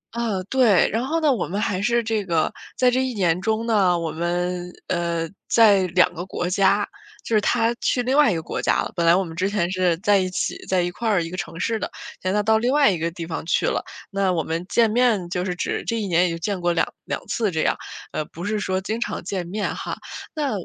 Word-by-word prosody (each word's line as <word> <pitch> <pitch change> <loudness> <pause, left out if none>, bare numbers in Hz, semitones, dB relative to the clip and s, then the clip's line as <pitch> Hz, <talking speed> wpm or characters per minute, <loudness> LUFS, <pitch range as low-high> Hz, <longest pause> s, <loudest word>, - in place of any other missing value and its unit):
嗯， 220 -5 -1
对， 245 -8 +4
然 230 +4 -1
后 320 +5 0
呢， 305 -2 +4
我 225 - -2
们 195 +4 -3
还 190 -3 -1
是 235 +2 +2
这 220 -2 -1
个 165 -3 +1 0.3
在 255 - +4
这 260 +1 +1
1 260 -1 -2
年 180 -4 +1
中 220 +2 0
呢， 195 -6 +3
我 165 -2 -3
们， 175 +1 -2 0.2
呃， 170 -1 -1 0.2
在 200 -5 +5
两 180 +1 +3
个 175 +1 -5
国 175 -1 -3
家， 195 +2 +2 0.4
就 225 - -1
是 210 - +4
他 225 +3 +2
去 250 - +1
另 255 +2 +1
外 290 -5 +5
一 180 - 0
个 160 - -3
国 - - -4
家 - - +2
了。 - - -6
本 170 - 0
来 170 - +7
我 190 - +2
们 165 -2 -8
之 190 +3 0
前 180 -4 0
是 180 -3 +1
在 200 +2 +3
一 185 -1 -1
起 180 - -2
在 185 -2 +2
一 175 - -2
块 225 +5 -2
儿 195 -5 +2
一 165 - -6
个 185 - -5
城 170 -1 -5
市 225 +4 0
的， - - -3 0.3
现 185 - -1
在 210 +1 +1
到 220 +1 +3
另 240 +3 +1
外 285 -4 +5
一 175 - -2
个 165 - 0
地 170 0 -7
方 160 -1 -4
去 - - +2
了。 - - 0 0.3
那 195 -1 +1
我 165 -3 0
们 165 +3 -3
见 230 -2 +3
面 225 -6 +2
就 180 -1 -1
是 180 -1 -2
只 180 - -2
这 230 -1 -1
一 210 - -2
年 175 0 +3
也 - - +1
就 165 - -3
见 185 +2 -3
过 175 - +2
两 165 - +1 0.2
2 - - -2
次 220 -4 0
这 160 -3 -1
样， - - +2 0.4
嗯， 155 - -2
不 170 +2 -7
是 210 +1 -1
说 190 -2 -1
经 215 +4 -3
常 - - -3
见 185 -1 -3
面 205 +4 -2
哈。 - - -5 0.4
那 295 -3 -1
190 Hz, 275 characters per minute, -23 LUFS, 175-220 Hz, 0.4 s, 来